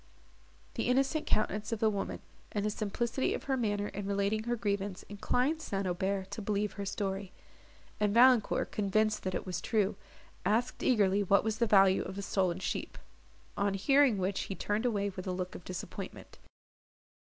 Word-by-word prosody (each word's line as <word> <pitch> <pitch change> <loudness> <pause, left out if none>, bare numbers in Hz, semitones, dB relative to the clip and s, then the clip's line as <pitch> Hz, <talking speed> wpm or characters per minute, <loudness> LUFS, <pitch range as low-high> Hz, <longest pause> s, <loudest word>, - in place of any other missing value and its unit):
The - - -2
innocent 270 +4 +1
countenance 215 0 0
of 230 - 0
the 220 - +3
woman, 200 -2 -2 0.3
and 205 -1 -1
the 210 - +1
simplicity 235 +5 -1
of - - -6
her 270 - 0
manner 205 -4 -1
in 200 0 -5
relating 200 +2 0
her 240 0 0
grievance, 200 -3 -2
inclined 250 +9 0
St. 195 -9 -2
Aubert 190 +2 -1
to 220 - -5
believe 205 0 -1
her 200 -1 -5
story; 195 -1 -3 0.7
and 210 -1 +2
Valancourt, 240 0 +4
convinced 215 +1 +1
that 185 -1 -3
it - - -3
was 180 -2 -3
true, 210 -2 +1 0.5
asked 230 +4 0
eagerly 205 -5 +3
what 200 0 +3
was 220 0 -2
the 235 - +3
value 195 -2 +5
of 190 - -6
the 200 - -4
stolen 185 -3 0
sheep; 185 -1 -4 0.6
on 200 0 0
hearing 270 +2 +4
which 190 +1 -1
he 195 - -5
turned 210 +6 -1
away 205 -3 0
with 185 0 -7
a - - 0
look 180 0 -3
of - - -9
disappointment. 185 +2 -7
205 Hz, 175 wpm, -31 LUFS, 195-220 Hz, 0.7 s, value